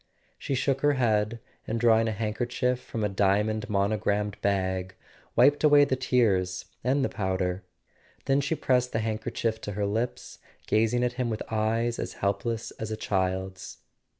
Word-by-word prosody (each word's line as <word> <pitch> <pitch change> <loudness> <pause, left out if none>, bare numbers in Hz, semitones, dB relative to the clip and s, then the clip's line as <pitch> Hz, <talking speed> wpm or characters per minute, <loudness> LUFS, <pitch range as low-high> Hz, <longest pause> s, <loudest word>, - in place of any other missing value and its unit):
She 135 - -2
shook 135 +1 0
her 145 0 +4
head 115 -3 +1 0.3
and, 115 - -1
drawing 115 -1 +4
a - - 0
handkerchief 120 +4 -1
from 115 -3 -5
a - - +3
diamond 105 +2 +1
monogrammed 105 0 0
bag, 95 -2 -1 0.4
wiped 145 +5 +5
away 145 -1 +7
the 130 - 0
tears 95 -8 +1 0.2
and 135 +3 +2
the - - +1
powder. 95 -1 -2 0.6
Then 135 0 +3
she 145 +4 -1
pressed 125 -4 +1
the - - +1
handker¬ 110 0 -3
chief 110 -1 -1
to 105 - -5
her 100 +1 -1
lips, 115 +4 -3 0.3
gazing 115 +3 +2
at 125 0 0
him 120 - 0
with 110 -1 -3
eyes 115 +2 0
as - - -4
helpless 115 +3 -2
as 110 - -4
a 110 - -3
child's. 95 -2 -2
110 Hz, 165 wpm, -27 LUFS, 100-125 Hz, 0.6 s, away